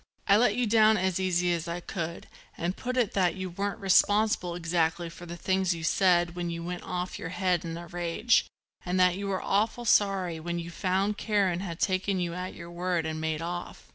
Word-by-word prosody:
I 200 Hz, -, +6 dB
let 215 Hz, -1 st, +4 dB
you 245 Hz, 0 st, +1 dB
down 220 Hz, 0 st, +5 dB
as 190 Hz, -1 st, 0 dB
easy 180 Hz, -1 st, +1 dB
as 170 Hz, 0 st, -3 dB
I 170 Hz, +1 st, -3 dB
could 170 Hz, -2 st, -5 dB, 0.3 s
and 175 Hz, +2 st, -2 dB
put 255 Hz, 0 st, -4 dB
it 240 Hz, -5 st, +2 dB
that 185 Hz, -2 st, +2 dB
you 185 Hz, -1 st, -5 dB
weren't 200 Hz, +3 st, -3 dB
responsible 200 Hz, -1 st, +3 dB
exactly 170 Hz, 0 st, 0 dB
for 175 Hz, +1 st, -11 dB
the 170 Hz, +1 st, -7 dB
things 190 Hz, 0 st, +1 dB
you 165 Hz, -, -7 dB
said 175 Hz, 0 st, +3 dB
when 175 Hz, -1 st, -3 dB
you 170 Hz, 0 st, -4 dB
went 175 Hz, +1 st, -4 dB
off 180 Hz, 0 st, -4 dB
your -, -, -5 dB
head 180 Hz, -2 st, 0 dB
in 165 Hz, -1 st, -5 dB
a 170 Hz, -, -8 dB
rage 175 Hz, +7 st, +1 dB, 0.4 s
and 180 Hz, +1 st, -1 dB
that 180 Hz, -1 st, +5 dB
you 200 Hz, +1 st, -4 dB
were 190 Hz, -1 st, -2 dB
awful 220 Hz, +4 st, 0 dB
sorry 195 Hz, -6 st, +2 dB
when 170 Hz, +2 st, -3 dB
you 170 Hz, 0 st, -5 dB
found 195 Hz, +4 st, 0 dB
Karen 200 Hz, -5 st, +1 dB
had 170 Hz, -3 st, -5 dB
taken 190 Hz, 0 st, 0 dB
you 175 Hz, -1 st, -2 dB
at 180 Hz, +1 st, -5 dB
your 170 Hz, 0 st, -9 dB
word 175 Hz, -1 st, -1 dB
and 155 Hz, 0 st, -3 dB
made 160 Hz, 0 st, -2 dB
off. 175 Hz, +1 st, -6 dB
180 Hz, 215 wpm, -28 LUFS, 170-195 Hz, 0.4 s, I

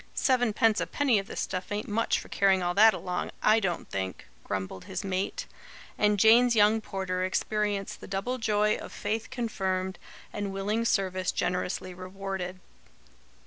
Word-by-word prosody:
"Seven 245 Hz, -4 st, +2 dB
pence 220 Hz, +1 st, +3 dB
'apenny 270 Hz, -7 st, +2 dB
of 195 Hz, -, -6 dB
this -, -, -4 dB
stuff 185 Hz, +1 st, -4 dB
ain't 205 Hz, +1 st, -2 dB
much 220 Hz, +2 st, +1 dB
for -, -, -10 dB
carrying 195 Hz, -2 st, +2 dB
all 175 Hz, 0 st, 0 dB
that 215 Hz, +3 st, +6 dB
along, 180 Hz, -1 st, -3 dB
I 215 Hz, +1 st, +5 dB
DON'T 180 Hz, -5 st, -2 dB
think!" 95 Hz, -1 st, -4 dB, 0.2 s
grumbled 95 Hz, -1 st, -4 dB
his -, -, -4 dB
mate; 195 Hz, -, -2 dB, 0.5 s
and 210 Hz, 0 st, +2 dB
Jane's 235 Hz, +3 st, +6 dB
young 215 Hz, +1 st, +4 dB
porter 190 Hz, -3 st, -3 dB
experienced 205 Hz, +1 st, -1 dB
the -, -, -9 dB
double 205 Hz, +6 st, -2 dB
joy 215 Hz, -1 st, +2 dB
of -, -, -9 dB
faith 220 Hz, +2 st, -3 dB
confirmed, 190 Hz, -7 st, -2 dB, 0.3 s
and 205 Hz, -1 st, -3 dB
willing 205 Hz, +4 st, -1 dB
service 185 Hz, -4 st, +1 dB
generously 180 Hz, 0 st, -2 dB
rewarded. 185 Hz, 0 st, -5 dB
200 Hz, 155 wpm, -28 LUFS, 185-220 Hz, 0.5 s, that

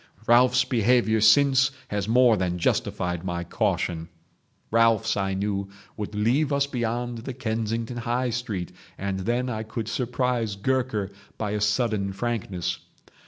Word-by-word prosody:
Ralphs' 125 Hz, +1 st, +5 dB
behaviour 115 Hz, -2 st, +2 dB
since 135 Hz, +4 st, +5 dB, 0.2 s
has 105 Hz, -1 st, -2 dB
more 120 Hz, 0 st, +5 dB
than 90 Hz, -3 st, -1 dB
justified 90 Hz, 0 st, -1 dB
my 85 Hz, -2 st, -3 dB
caution..... 80 Hz, 0 st, -1 dB, 0.6 s
Ralphs, 115 Hz, -1 st, +3 dB
I 95 Hz, -1 st, -1 dB
knew, 100 Hz, 0 st, -2 dB, 0.3 s
would 105 Hz, -1 st, -5 dB
leave 125 Hz, +8 st, +2 dB
us 140 Hz, 0 st, +2 dB
beyond 120 Hz, -2 st, -3 dB
the 125 Hz, +2 st, -6 dB
Kensington 115 Hz, -1 st, -2 dB
High 120 Hz, +1 st, -1 dB
Street, 110 Hz, -7 st, -3 dB, 0.3 s
and 95 Hz, -1 st, -3 dB
then 120 Hz, +6 st, -1 dB
I 110 Hz, -3 st, -3 dB
could 110 Hz, 0 st, -5 dB
surprise 125 Hz, -3 st, -1 dB
Gurker 110 Hz, -2 st, -1 dB, 0.3 s
by 105 Hz, -2 st, -2 dB
a 105 Hz, 0 st, -2 dB
sudden 105 Hz, -2 st, +1 dB
frankness. 100 Hz, -5 st, -3 dB
115 Hz, 135 wpm, -25 LUFS, 100-125 Hz, 0.6 s, Ralphs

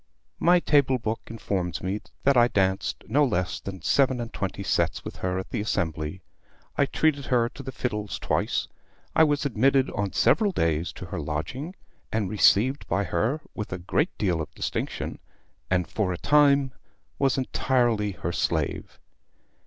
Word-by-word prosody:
"My 175 Hz, +1 st, +5 dB
table 140 Hz, -5 st, +3 dB
book 110 Hz, -1 st, -2 dB
informs 95 Hz, -7 st, -3 dB
me 95 Hz, +3 st, -2 dB, 0.2 s
that 140 Hz, 0 st, +4 dB
I 120 Hz, -1 st, +6 dB
danced 95 Hz, -4 st, 0 dB
no 150 Hz, +2 st, +3 dB
less 90 Hz, -9 st, 0 dB
than 95 Hz, -4 st, -8 dB
seven 130 Hz, -, +3 dB
and 115 Hz, -1 st, -5 dB
twenty 95 Hz, -3 st, -3 dB
sets -, -, 0 dB
with -, -, -7 dB
her 90 Hz, 0 st, -2 dB
at 95 Hz, -, -5 dB
the -, -, -1 dB
Assembly. 80 Hz, -3 st, -2 dB, 0.5 s
I 140 Hz, -, +2 dB
treated 145 Hz, -3 st, +1 dB
her 120 Hz, -2 st, +2 dB
to 140 Hz, -, -10 dB
the 135 Hz, -1 st, -6 dB
fiddles 105 Hz, -5 st, -3 dB
twice. -, -, -1 dB, 0.5 s
I 160 Hz, -, +7 dB
was 145 Hz, -1 st, +1 dB
admitted 135 Hz, +1 st, +2 dB
on 100 Hz, -1 st, -2 dB
several 210 Hz, -3 st, +3 dB
days 80 Hz, -, 0 dB
to -, -, -8 dB
her 90 Hz, -2 st, -5 dB
lodging, 80 Hz, -, -4 dB, 0.4 s
and 105 Hz, -4 st, -1 dB
received 110 Hz, +5 st, +3 dB
by 100 Hz, -, +1 dB
her 110 Hz, -, 0 dB
with 105 Hz, -, -5 dB
a 90 Hz, -, -2 dB
great 120 Hz, -, -1 dB
deal 90 Hz, -6 st, 0 dB
of 75 Hz, -, -6 dB
distinction, -, -, -3 dB, 0.5 s
and, 90 Hz, -2 st, +1 dB
for 100 Hz, -4 st, -1 dB
a 90 Hz, -, -3 dB
time, 140 Hz, -, +4 dB, 0.5 s
was 135 Hz, -2 st, +2 dB
entirely 120 Hz, -5 st, +1 dB
her 85 Hz, -1 st, -4 dB
slave. 80 Hz, -4 st, -2 dB
110 Hz, 165 wpm, -26 LUFS, 90-135 Hz, 0.5 s, I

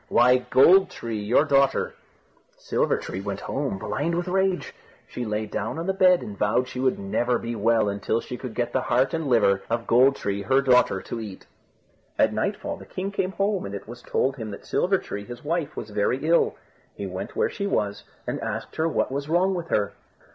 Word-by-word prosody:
"Why, 125 Hz, +1 st, +5 dB
Gold 175 Hz, +9 st, +5 dB
tree, 115 Hz, -2 st, -5 dB
your 120 Hz, +8 st, +3 dB
daughter." 140 Hz, -2 st, +2 dB, 0.6 s
Silver -, -, 0 dB
tree 95 Hz, -, -5 dB
went 100 Hz, 0 st, -4 dB
home, 135 Hz, -8 st, -2 dB
blind 145 Hz, -, -2 dB
with 175 Hz, +1 st, -2 dB
rage. 190 Hz, 0 st, 0 dB, 0.3 s
She 125 Hz, -, -5 dB
lay 105 Hz, 0 st, -2 dB
down 110 Hz, +4 st, -4 dB
on 165 Hz, -, -3 dB
the 190 Hz, -, +1 dB
bed, 185 Hz, -2 st, +4 dB
and 105 Hz, -, -7 dB
vowed 105 Hz, +5 st, +1 dB
she 125 Hz, -, -7 dB
would 130 Hz, 0 st, +1 dB
never 120 Hz, +5 st, 0 dB
be 115 Hz, 0 st, -4 dB
well 115 Hz, -2 st, +2 dB
until 100 Hz, +3 st, -1 dB
she 125 Hz, -, -6 dB
could 125 Hz, -2 st, -7 dB
get 120 Hz, -1 st, -1 dB
the -, -, +2 dB
heart 130 Hz, +4 st, +1 dB
and 160 Hz, -1 st, -1 dB
the -, -, -2 dB
liver 100 Hz, -5 st, +4 dB
of 115 Hz, 0 st, -1 dB
Gold 130 Hz, +4 st, +5 dB
tree, 100 Hz, -4 st, -3 dB
her 135 Hz, +6 st, +3 dB
daughter, 125 Hz, -7 st, +3 dB
to 120 Hz, -, -5 dB
eat. 105 Hz, -4 st, -8 dB, 0.7 s
At -, -, +3 dB
nightfall -, -, -2 dB
the -, -, -12 dB
king 195 Hz, +2 st, -4 dB
came 190 Hz, -1 st, -1 dB
home, 200 Hz, -1 st, 0 dB
and 100 Hz, -, -5 dB
it 100 Hz, -, -8 dB
was 120 Hz, +2 st, -9 dB
told 135 Hz, +2 st, 0 dB
him 110 Hz, -3 st, -5 dB
that 100 Hz, -, -9 dB
Silver 195 Hz, +1 st, +2 dB
tree, 100 Hz, -, -6 dB
his 120 Hz, +2 st, -10 dB
wife, 165 Hz, 0 st, -2 dB
was 105 Hz, -, -6 dB
very 115 Hz, +8 st, 0 dB
ill. 170 Hz, +1 st, +3 dB, 0.4 s
He -, -, -5 dB
went -, -, -6 dB
where 460 Hz, 0 st, +1 dB
she 200 Hz, -2 st, -3 dB
was, 105 Hz, -, -1 dB, 0.2 s
and -, -, -3 dB
asked -, -, -5 dB
her 160 Hz, -, +2 dB
what 160 Hz, -, 0 dB
was 140 Hz, +2 st, -3 dB
wrong 180 Hz, +4 st, +3 dB
with 175 Hz, -2 st, -4 dB
her. 100 Hz, -9 st, 0 dB
125 Hz, 215 wpm, -25 LUFS, 110-165 Hz, 0.7 s, Why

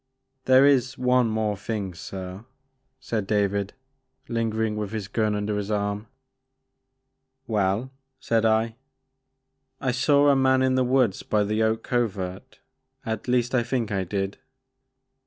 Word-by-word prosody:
There 130 Hz, +1 st, +6 dB
is 135 Hz, -2 st, +3 dB
one 125 Hz, -1 st, +3 dB
more 110 Hz, -1 st, 0 dB
thing 100 Hz, -2 st, -4 dB
sir,'* 95 Hz, +4 st, -8 dB, 0.5 s
said 115 Hz, -6 st, -3 dB
David, 100 Hz, -1 st, 0 dB, 0.5 s
lingering 110 Hz, -2 st, -1 dB
with 105 Hz, 0 st, -4 dB
his 105 Hz, -3 st, -3 dB
gun 105 Hz, 0 st, 0 dB
under 105 Hz, 0 st, -1 dB
his 105 Hz, 0 st, -3 dB
arm. 105 Hz, 0 st, -2 dB, 1.4 s
Well, 105 Hz, +2 st, 0 dB, 0.3 s
saidI. 115 Hz, -1 st, +2 dB, 1.1 s
I 130 Hz, -, 0 dB
saw 140 Hz, +3 st, +4 dB
a 140 Hz, -, +5 dB
man 130 Hz, -1 st, +3 dB
in 130 Hz, 0 st, +2 dB
the 130 Hz, 0 st, +3 dB
woods 125 Hz, -5 st, +2 dB
by 105 Hz, -1 st, +1 dB
the 110 Hz, +2 st, 0 dB
Oak 110 Hz, 0 st, +1 dB
Covert, 100 Hz, -6 st, -3 dB, 0.4 s
—at 110 Hz, 0 st, -4 dB
least 125 Hz, 0 st, +1 dB
I 125 Hz, -, +3 dB
think 120 Hz, -2 st, -2 dB
I 95 Hz, -2 st, 0 dB
did. 95 Hz, +1 st, -3 dB
110 Hz, 135 wpm, -25 LUFS, 100-125 Hz, 1.4 s, There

